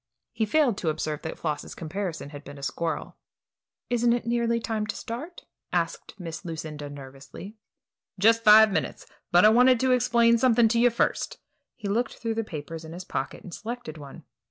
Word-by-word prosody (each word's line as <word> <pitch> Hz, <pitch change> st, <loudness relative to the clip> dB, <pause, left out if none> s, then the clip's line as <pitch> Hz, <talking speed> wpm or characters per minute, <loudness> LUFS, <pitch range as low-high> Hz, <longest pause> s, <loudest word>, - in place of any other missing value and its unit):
He 220 Hz, -, -1 dB
failed 260 Hz, -5 st, +2 dB
to 165 Hz, -, 0 dB
observe 155 Hz, -1 st, -3 dB
that 160 Hz, -, -6 dB
Floss's 155 Hz, -3 st, -4 dB
comparison 170 Hz, -2 st, -5 dB
had 145 Hz, -1 st, -9 dB
been 145 Hz, 0 st, -10 dB
a 140 Hz, -, -11 dB
squirrel. 160 Hz, +2 st, -3 dB, 0.7 s
"Isn't 240 Hz, 0 st, +3 dB
it 240 Hz, -1 st, -2 dB
nearly 235 Hz, 0 st, +1 dB
time 220 Hz, -2 st, -2 dB
to -, -, -3 dB
start?" 280 Hz, +10 st, -7 dB, 0.3 s
asked -, -, -2 dB
Miss 165 Hz, -3 st, -6 dB
Lucinda, 155 Hz, -3 st, -6 dB
nervously. 140 Hz, +8 st, -10 dB, 0.6 s
"Just 225 Hz, +4 st, +4 dB
five 215 Hz, 0 st, +8 dB
minutes; 160 Hz, -5 st, -2 dB, 0.3 s
but 175 Hz, +3 st, +6 dB
I -, -, +9 dB
want 250 Hz, +2 st, +5 dB
to 260 Hz, +1 st, +2 dB
explain 235 Hz, -2 st, +4 dB
something 240 Hz, -2 st, +5 dB
to 230 Hz, +1 st, +2 dB
you 245 Hz, +1 st, +6 dB
first." 235 Hz, -, -1 dB, 0.4 s
He 215 Hz, -, -6 dB
looked 230 Hz, +5 st, -1 dB
through 230 Hz, -1 st, -3 dB
the 225 Hz, 0 st, -1 dB
papers 160 Hz, -3 st, -7 dB
in 160 Hz, 0 st, -9 dB
his 180 Hz, +2 st, -7 dB
pocket 135 Hz, -, -4 dB
and 180 Hz, -, -10 dB
selected 225 Hz, -9 st, -6 dB
one. 145 Hz, +3 st, -11 dB
210 Hz, 180 wpm, -26 LUFS, 160-235 Hz, 0.7 s, I